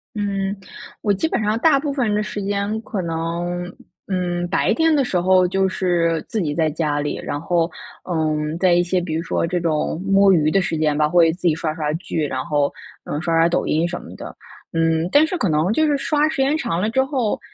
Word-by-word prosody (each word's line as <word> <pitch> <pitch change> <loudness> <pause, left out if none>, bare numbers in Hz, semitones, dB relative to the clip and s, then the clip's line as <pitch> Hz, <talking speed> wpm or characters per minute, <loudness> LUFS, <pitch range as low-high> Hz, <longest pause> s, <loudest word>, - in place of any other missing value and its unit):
嗯， 200 -1 -2 0.5
我 205 - +2
基 200 +12 0
本 240 - -1
上 210 +2 +1
大 310 -2 +4
部 285 0 -3
分 245 -7 0
的 210 - 0
时 210 -1 -5
间 205 +2 -2
可 215 -4 -4
能， 175 +1 -3 0.4
嗯， 175 -2 -1
白 195 - +2
天 325 -1 +3
的 275 -3 +2
时 185 - 0
候 185 0 +4
就 190 +1 +1
是 170 -3 0
自 220 - -2
己 150 -4 -1
在 160 -2 +2
家 150 -1 -1
里。 145 0 -2
然 145 - -3
后 170 0 0 0.4
嗯， 155 -1 -1
在 180 0 +3
一 175 - +4
些 180 +1 0
比 175 -2 -4
如 160 - -1
说 170 - -1
这 175 +1 -1
种 160 0 -1
摸 195 0 +4
鱼 155 -2 +3
的 195 +3 +2
时 165 - -2
间 150 -1 +1
吧， 150 0 +3
会 165 0 +4
自 175 - -14
己 160 - +4
刷 155 -1 -3
刷 150 -2 -2
剧， 160 -2 -2
然 130 -2 -3
后， 145 -3 0 0.3
嗯， 150 - -3
刷 165 -1 0
刷 165 0 +5
抖 170 - 0
音 160 +3 +1
什 175 0 -5
么 - - -12
的。 - - -9 0.4
嗯， 165 0 +1
但 295 +2 +6
是 360 - -3
可 205 - 0
能 155 +4 +1
就 315 +6 +2
是 295 -2 +2
刷 295 +2 +1
时 280 - -5
间 275 +3 +2
长 170 - -2
了 210 +4 0
之 265 +3 +2
后， 265 -5 -1
175 Hz, 250 characters per minute, -21 LUFS, 160-205 Hz, 0.5 s, 但